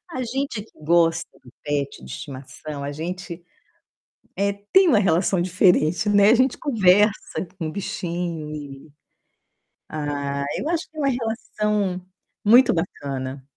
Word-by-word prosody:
A 255 - -2
gente 255 -1 -3
que 225 - -22
gosta 165 +1 +2 0.2
do 125 - -16
pet 140 - -2
de 65 - -11
estimação, 135 - -8
a 140 - -3
gente, 175 +2 -6 0.9
eh, 200 0 +1 0.2
tem 380 -1 +6
uma 255 - +5
relação 180 0 +2
diferente, 180 -1 +3
né, 205 0 +6
a 235 - +7
gente 255 +1 +2
conversa 210 - +2
com 160 - -2
bichinho 170 -4 -4
e 145 0 -9 1.0
Ah, 140 -2 -3
eu 300 - -3
acho 335 -1 -1
que 315 - -19
é - - -4
uma 275 -1 +2
relação 210 -5 -1 0.4
muito 245 +5 +7
bacana. 135 -6 -4
180 Hz, 135 wpm, -23 LUFS, 150-210 Hz, 1.0 s, a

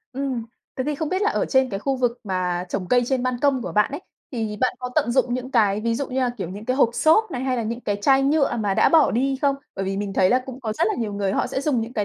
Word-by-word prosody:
Ừm. 260 -4 -3 0.3
Thế 260 - -2
thì 300 +1 -1
không 310 +1 -3
biết 375 +4 -1
là 420 - +3
ở - - 0
trên 265 -1 +2
cái 195 - -3
khu 270 +2 -1
vực 245 -1 0
mà 180 -2 -1
trồng 185 -1 -3
cây 245 0 +4
trên 260 -1 0
ban 255 -1 -1
công 275 -4 +2
của 180 - -5
bạn 210 +8 +2
ấy, 285 - -5 0.3
thì 220 -4 -3
bạn 255 - +1
có 250 0 -5
tận 235 - +2
dụng 250 -2 +2
những 255 +1 -4
cái, 210 -4 +2
ví 230 +1 0
dụ 275 +4 -2
như 265 +1 -1
là 250 -1 +1
kiểu 175 - -4
những 205 +3 -8
cái 255 +2 -1
hộp 255 -4 +4
xốp 415 - +3
này 250 - -4
hay 260 -1 0
là 235 - -1
những 230 +2 -4
cái 205 -3 -2
chai 270 +7 +3
nhựa 280 -3 +2
mà 205 -3 0
đã - - +4
bỏ 320 -4 +5
đi 265 +3 0
không? 280 -1 +2 0.2
Bởi 195 - -3
vì 195 0 -2
mình 200 -1 -3
thấy 185 -1 +3
là 255 +1 +3
cũng 260 0 -8
có 220 -4 -3
rất 220 - +1
là - - 0
nhiều 215 -3 -2
người 200 -1 -1
họ - - 0
sẽ - - -3
dùng 275 -5 0
những 225 +2 -5
cái 210 -4 -1
245 Hz, 320 wpm, -23 LUFS, 210-270 Hz, 0.3 s, bỏ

